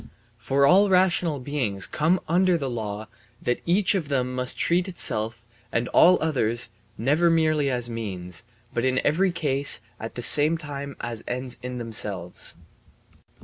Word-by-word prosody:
For 135 +5 +1
all 195 +6 +5
rational 180 -5 +2
beings 125 -8 -1
come 165 +5 +1
under 180 +1 +2
the 135 -5 -4
law 110 -2 -5 0.3
that 120 - -2
each 185 +4 +3
of 180 -7 -2
them 130 -3 -1
must 125 0 0
treat 175 +2 +1
itself 115 - -2 0.3
and 115 +1 -1
all 180 +2 +6
others 120 -6 0 0.3
never 150 +9 +2
merely 155 -3 +2
as 120 -2 -2
means, 100 -4 -4 0.3
but 120 - -1
in 130 0 +1
every 185 +5 +2
case 145 -4 +2 0.2
at 115 - -7
the 120 - -5
same 150 +6 +7
time 140 -2 -7
as 115 -2 -5
ends 125 0 -4
in 125 0 -6
themselves. 105 -6 -3
135 Hz, 150 wpm, -24 LUFS, 115-165 Hz, 0.3 s, same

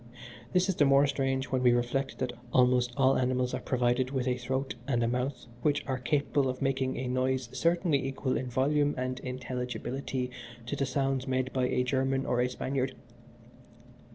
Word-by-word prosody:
This 180 +1 +3
is 190 - -1
the 145 - +5
more 140 +1 +5
strange 135 -1 -1
when 130 -1 +1
we 125 -1 +5
reflect 120 +3 -1
that 125 -2 -2 0.2
almost 125 -1 +4
all 135 -1 +4
animals 125 0 0
are - - -1
provided 125 0 +1
with 130 -2 -1
a 125 - +2
throat 130 +1 -2
and 120 -4 +1
a - - +2
mouth 125 +3 -2 0.2
which 145 +1 +1
are 130 -1 -2
capable 140 +1 +1
of 130 - -4
making 135 -1 0
a 130 - -3
noise 130 0 0
certainly 170 -4 +1
equal 135 0 -1
in 130 - -2
volume 145 +4 +1
and 130 0 -2
intelligibility 125 0 -4 0.3
to 125 - -3
the 140 -1 -1
sounds 135 0 0
made 130 0 -1
by 130 -1 +1
a 125 - +1
German 135 +1 0
or 125 - +1
a 125 - +1
Spaniard. 130 0 -2
130 Hz, 180 wpm, -30 LUFS, 125-135 Hz, 0.3 s, the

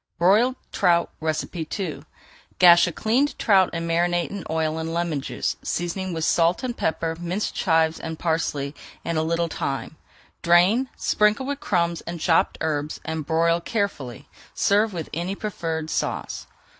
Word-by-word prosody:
BROILED 215 +9 +4 0.2
TROUT 175 -3 +2
II 160 +2 -3 0.5
Gash 175 -1 +7
a - - -2
cleaned 245 - 0
trout 190 -4 +4
and 165 0 -3
marinate 175 +1 +1
in 200 -2 -5
oil 160 0 -1
and 160 0 -3
lemon 170 -4 -1
juice, - - -3
seasoning 180 +2 -3
with 165 -1 -2
salt 170 +6 +2
and 245 -2 -2
pepper, 160 0 -1
minced 175 +4 -2
chives, 160 -2 +2
and 160 0 -5
parsley, 150 -4 -1 0.3
and 165 -1 0
a - - +2
little 170 +1 0
thyme. 145 -1 -4 0.4
Drain, 185 +10 +4
sprinkle 210 +5 +2
with 285 +1 -3
crumbs 170 -6 0
and 170 0 -5
chopped 165 +1 +2
herbs, 150 -1 -2
and 160 -2 -4
broil 165 +1 +2
carefully. 170 - -3 0.3
Serve 210 +2 +3
with 170 -4 -5
any 175 +4 -2
preferred 165 -7 -4
sauce. - - -3
170 Hz, 150 wpm, -24 LUFS, 160-190 Hz, 0.5 s, Gash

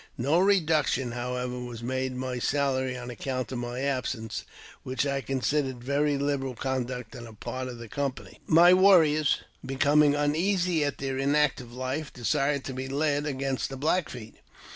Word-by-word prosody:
No 145 +8 +2
reducti 160 -10 +2
however, 125 +1 -3
was 120 -2 -7
made 130 +1 -2
in - - -7
my 130 -1 -3
salary 130 -1 0
on 125 0 -6
account 130 +1 -4
of 125 - -3
my 120 +1 -4
absen; 130 -5 -2 0.5
which 130 +1 -2
I 140 -1 -1
considered 130 0 -1
very 140 +2 +1
liberal 140 -2 -1
conduct 125 -2 -3
on 120 -1 -8
the 115 - -11
part 130 +4 -5
of 120 -2 -7
t' 115 - -8
company. 140 +3 -4
My 170 +3 +7
warriors, 165 -6 +5 0.2
becoming 145 +2 +3
uneasy 170 +3 +1
at 145 -1 -2
their 135 -1 -3
inactive 140 -3 +1
life, 130 +4 -4
desi 140 +3 0
to 135 - -5
be 130 +1 -4
led 145 +1 0
against 135 -2 -2
the 135 - -6
Black 155 +5 +1
Feet. 115 -3 -9
135 Hz, 165 wpm, -27 LUFS, 125-145 Hz, 0.5 s, My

